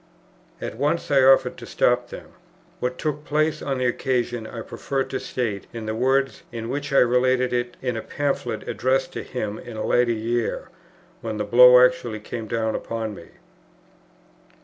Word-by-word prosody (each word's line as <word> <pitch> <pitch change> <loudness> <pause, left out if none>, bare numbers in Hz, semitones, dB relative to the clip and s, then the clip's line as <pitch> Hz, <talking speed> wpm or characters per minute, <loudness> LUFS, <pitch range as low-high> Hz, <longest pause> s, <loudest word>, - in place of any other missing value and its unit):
At - - -6
once 150 +4 -1
I 140 -1 +5
offered 135 +1 +5
to - - -10
stop - - +1
them. - - -10 0.5
What 125 0 -2
took 150 -1 -3
place 155 +1 0
on 135 -2 -2
the 130 - -1
occasion 120 -2 -1
I 115 - -7
prefer 135 +4 -3
to - - -4
state 110 -6 -3
in 115 -2 -6
the 110 - -2
words, 130 +3 +1
in 115 -1 -5
which 145 +2 -3
I 140 - +3
related 125 +1 +3
it 120 0 -2
in 125 -2 -1
a 110 - -3
Pamphlet 135 -6 -3
addressed 130 +1 0
to - - -4
him 110 -5 -4
in 120 -2 -9
a 110 - -2
later 120 -1 +3
year, 115 +1 -2 0.5
when 110 -2 -4
the 105 - -1
blow 125 +3 +8
actually 120 -7 -2
came 110 +1 -6
down 110 0 -1
upon 115 -2 -4
me. 85 - -11
125 Hz, 175 wpm, -23 LUFS, 115-135 Hz, 0.5 s, blow